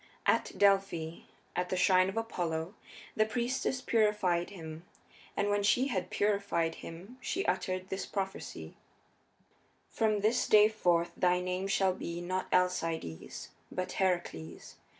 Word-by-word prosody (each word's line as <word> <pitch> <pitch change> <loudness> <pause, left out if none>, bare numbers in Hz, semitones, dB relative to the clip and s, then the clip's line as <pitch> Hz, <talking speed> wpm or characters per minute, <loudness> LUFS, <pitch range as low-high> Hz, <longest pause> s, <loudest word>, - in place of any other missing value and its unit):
At - - +2
Delphi, 195 -5 +2 0.3
at 180 0 -1
the 185 - -1
shrine 185 0 +4
of 195 - -6
Apollo, 175 -6 -2 0.4
the 215 - +4
priestess 250 +2 -1
purified 210 -7 +2
him, 160 -4 -8 0.5
and 205 - +2
when 205 0 +2
she 250 +7 +3
had 185 -6 -2
purified 200 -5 +1
him 190 +10 -10
she 380 +9 -2
uttered 185 0 -1
this 190 - -3
prophecy: 190 - -5 1.2
"From 215 -2 +1
this 225 +4 +2
day 215 0 +7
forth 175 -5 +1
thy 180 -1 +3
name 180 +1 -2
shall 195 -1 +2
be, 170 -1 -5
not 185 +2 -2
Alcides, 165 - -1 0.2
but 185 - -3
Heracles. 175 - -2
185 Hz, 130 wpm, -32 LUFS, 175-205 Hz, 1.2 s, day